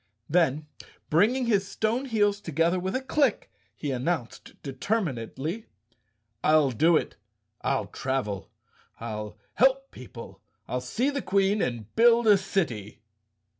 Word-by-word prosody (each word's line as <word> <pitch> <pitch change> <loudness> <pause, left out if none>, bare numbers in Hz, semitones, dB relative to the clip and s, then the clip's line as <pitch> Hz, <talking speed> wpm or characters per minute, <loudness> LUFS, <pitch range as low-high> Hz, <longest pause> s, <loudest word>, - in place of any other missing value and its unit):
Then, 155 -3 +2 0.5
bring¬ 205 +11 +4
ing 260 -1 -1
his 200 -4 +2
stone 220 +6 -1
heels 205 -4 +1
together 165 +1 +1
with 190 +4 -3
a 260 - -1
click, 270 -3 +1 0.2
he 145 - -3
announced 130 0 -3
determinedly, 150 - -3 0.8
"I'll 155 -3 +4
do 160 +7 +4
it! - - -4 0.4
I'll 135 -1 0
travel, 130 -8 -3 0.5
I'll 105 -2 -6 0.2
help 270 +1 +3
people, 120 -2 -11 0.3
I'll 125 - -2
see 235 - 0
the 280 -1 -2
Queen 195 +1 +2
and 115 -4 -3
build 235 +1 +5
a 205 -3 +6
city!" 120 - -3
175 Hz, 130 wpm, -27 LUFS, 130-220 Hz, 0.8 s, a